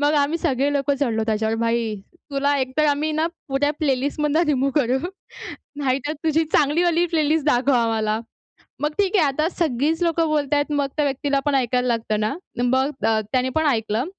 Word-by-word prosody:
मग 290 +1 +3
आम्ही 295 +4 0
सगळे 285 -4 0
लोकं 285 0 +1
चढलो 225 -5 0
त्याच्यावर. 220 0 0
भाई 230 -1 0 0.4
तुला 280 +1 +1
एकतर 265 +3 0
आम्ही 295 +2 +1
ना 315 +1 +1 0.2
पुऱ्या 275 +2 +1
प्लेलिस्ट 280 0 -1
मधनं 300 +3 +2
रिमूव्ह 275 -2 +1
करू. 255 +1 +1 0.8
नाहीतर 275 +1 -1
तुझी 320 +1 +2
चांगली 295 +4 +3
वाली 345 0 +2
प्लेलिस्ट 310 -2 +1
दाखव 270 -1 +3
आम्हाला. 225 -3 +1 0.6
मग 295 - 0
ठीक 405 +1 +2
आहे 335 - +4
आता 305 +4 0
सगळीचं 320 0 0
लोकं 330 0 +1
बोलतायेत 290 -1 0
मग 285 -1 +1
त्या 300 - +2
व्यक्तीला 275 0 0
पण 290 - +2
ऐकायला 250 -1 +1
लागतं 225 -3 -1
ना. 215 +4 0 0.3
मग 260 +3 +2 0.2
अ, 220 -1 +2
त्याने 255 0 +1
पण 315 - +2
ऐकलं 225 -2 0
280 Hz, 180 wpm, -22 LUFS, 250-305 Hz, 0.8 s, आहे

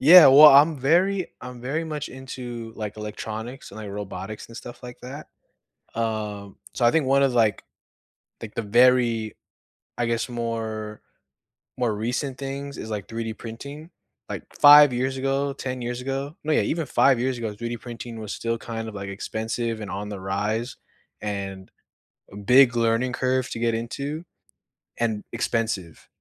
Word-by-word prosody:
Yeah. 165 +4 +10
Well, 145 +3 +10
I'm 145 +2 +6
very 180 +7 +2
I'm 125 -1 -9
very 150 +7 -2
much 150 -2 -4
into, 125 -3 -7
like, 105 -1 -5
electronics 110 +4 -6
and, - - -10
like, 105 -2 -7
robotics 100 +1 -6
and 115 - -11
stuff 120 +1 -10
like 125 0 -9
that. 135 +4 -9 0.7
Uh, 105 -3 -3 0.2
so, 120 - +1
I 120 - +6
think 160 -1 +2
1 135 +1 +4
of, 135 -2 +2
like 110 -4 +2 0.8
like, 110 -2 -8
the - - -1
very 115 0 +3 0.6
I 120 - +1
guess, 115 +1 -1
more 110 -3 -4 0.8
more 120 -4 +1
recent 125 +5 -3
things 140 +1 -5
is, 110 - -6
like, 105 -2 -4
3D 115 -1 -5
printing. 140 +8 -9 0.4
Like, - - -5 0.2
5 145 -1 +9
years 130 +2 -1
ago, 135 +1 0
10 130 -2 -5
years 120 +1 -3
ago 135 +4 -4
no, 155 - 0
yeah, - - +4
even 165 -1 -1
5 135 -1 +4
years 130 0 -1
ago, 110 -3 -4
3D 120 +2 -5
printing 120 -1 -8
was 105 -1 -5
still 115 0 -2
kind 115 -1 -5
of, 110 - -8
like, 100 -1 -6
expensive 110 +3 -3
and 105 - -6
on 100 +2 -4
the 100 -2 -6
rise 105 +6 -2 0.5
and 100 -2 -5 0.6
a - - -10
big 120 +4 +5
learning 115 +2 +1
curve 130 0 0
to - - -4
get 115 0 +1
into 140 +8 -4 0.8
and 110 -3 0
expensive, 110 -7 -2
120 Hz, 165 wpm, -24 LUFS, 110-135 Hz, 0.8 s, Yeah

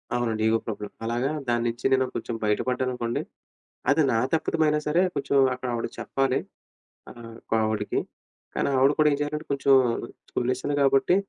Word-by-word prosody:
అవునండి. 115 -3 0
Ego 115 0 +3
problem 105 -2 -5
అలాగా 120 +4 0 0.2
దానించి 120 0 -1
నేను 130 0 +3
కొంచెం 115 - -3
బయటపడ్డాననుకోండి. 125 +2 -1 0.7
అది 150 +3 +4
నా 115 - +2 0.2
తప్పితమయినా 155 -1 +2
సరే 160 +4 +3
కొంచెం 140 0 0 0.2
అక్కడావిడ 125 -2 -3
చెప్పాలి. 135 -1 0 0.7
ఆ! - - -9 0.3
ఇంకో - - -2
ఆవిడకి 110 -1 -1 0.6
కానీ - - +1
ఆవిడ 135 +2 +5
కూడా 150 - +6
ఏం - - +2
చేయాలంటే 150 +1 -3
కొంచెం 140 0 +3 0.6
స్కూల్ 125 +1 -1
విషయం 130 +3 -4
కాబట్టి 135 +5 +4
130 Hz, 145 wpm, -26 LUFS, 115-140 Hz, 0.7 s, కూడా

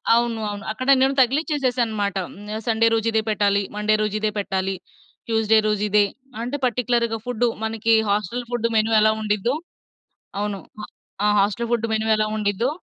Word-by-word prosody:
అవును. 235 -1 0
అవును. 205 -1 -6
అక్కడ 255 +4 -5
నేను 270 +1 +3
తగిలిచ్చేసేశానన్నమాట. 250 - 0 0.2
హ్మ్. 210 +2 -7
సండే 230 0 +3
రోజు 225 0 +1
ఇదే 220 0 +2
పెట్టాలి, 200 -1 +2
మండే 210 +1 +2
రోజు 210 -1 -1
ఇదే 215 0 0
పెట్టాలి, 190 -1 -2 0.5
ట్యూస్‌డే 225 -1 +3
రోజు 210 -1 0
ఇదే 205 0 +4 0.4
అంటే 245 +4 -3
పర్టిక్యులర్‌గా 240 -2 0
ఫుడ్డు. 245 -1 0 0.2
మనకి 225 0 +1 0.2
హాస్టల్ 210 +4 -1
ఫుడ్డు 240 -1 0
మెను 220 +1 +2
ఎలా 215 0 +4
ఉండిద్దో 215 +4 0 0.8
అవును. 205 -1 -2 0.2
ఆ! - - -5 0.4
ఆ - - +4
హాస్టల్ 210 +4 0
ఫుడ్డు 230 -1 +1
మెను 220 0 0
ఎలా 215 0 0
ఉండిద్దో 210 +3 0
220 Hz, 160 wpm, -22 LUFS, 210-235 Hz, 0.8 s, ఇదే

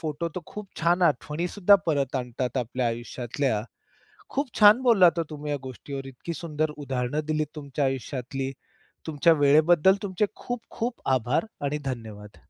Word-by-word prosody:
Photo 160 +1 -3
तर 180 - -3
खूप 210 -2 -8
छान 175 +2 +2
आठवणी 150 +3 +1
सुद्धा 205 +1 +5
परत 140 -4 0
आणतात 125 +1 -3
आपल्या 125 +1 -1
आयुष्यातल्या. 120 0 -2 0.7
खूप 280 0 -1
छान 210 +3 +8
बोललात 185 -9 +5
हो - - +2
तुम्ही 150 -1 -5
या 145 - 0
गोष्टीवर 135 +2 -7
इतकी 135 +6 -7
सुंदर 155 -1 -2
उदाहरणं 135 0 -2
दिलीत 155 -1 0
तुमच्या 140 -1 -2
आयुष्यातली. 135 +1 -3 0.5
तुमच्या 160 +2 +4
वेळेबद्दल 155 +5 +5
तुमचे 200 +1 0
खूप, 245 -1 -5
खूप 235 +1 -3 0.2
आभार 125 - 0 0.2
आणि 150 +2 -1
धन्यवाद. 110 -5 -6
145 Hz, 150 wpm, -26 LUFS, 130-170 Hz, 0.7 s, छान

